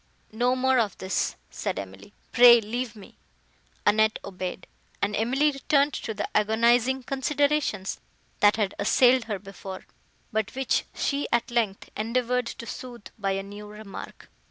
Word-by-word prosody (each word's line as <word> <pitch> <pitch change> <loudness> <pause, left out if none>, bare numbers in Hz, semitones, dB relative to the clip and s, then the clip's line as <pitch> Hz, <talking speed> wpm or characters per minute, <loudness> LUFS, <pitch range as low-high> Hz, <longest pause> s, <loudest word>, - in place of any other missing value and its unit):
'" - - -37
"No 245 +3 +1
more 260 0 +3
of 210 -5 0
this," 190 - -1 0.2
said - - -3
Emily, 95 - -8 0.2
"pray 240 -1 +8
leave 230 +2 -4
me." 205 -3 -14 0.7
Annette 215 +1 +4
obeyed, 185 -1 -5 0.3
and 205 +1 0
Emily 265 +8 +2
returned 280 +1 +2
to 220 - -4
the 205 - -2
agonizing 235 +4 +3
considerations, 280 -5 0 0.4
that 205 0 +5
had 210 -3 0
assailed 250 +4 +4
her 210 -3 -3
before, 195 -1 -9 0.5
but 220 +1 -2
which 265 -1 0
she, 280 0 -1
at 235 - +1
length, 220 -5 -1
endeavoured 245 +2 0
to 235 - -7
sooth 240 -2 -8
by 195 -1 0
a 195 0 -2
new 205 +1 -9
remark. 210 -1 -10
225 Hz, 150 wpm, -26 LUFS, 205-255 Hz, 0.7 s, pray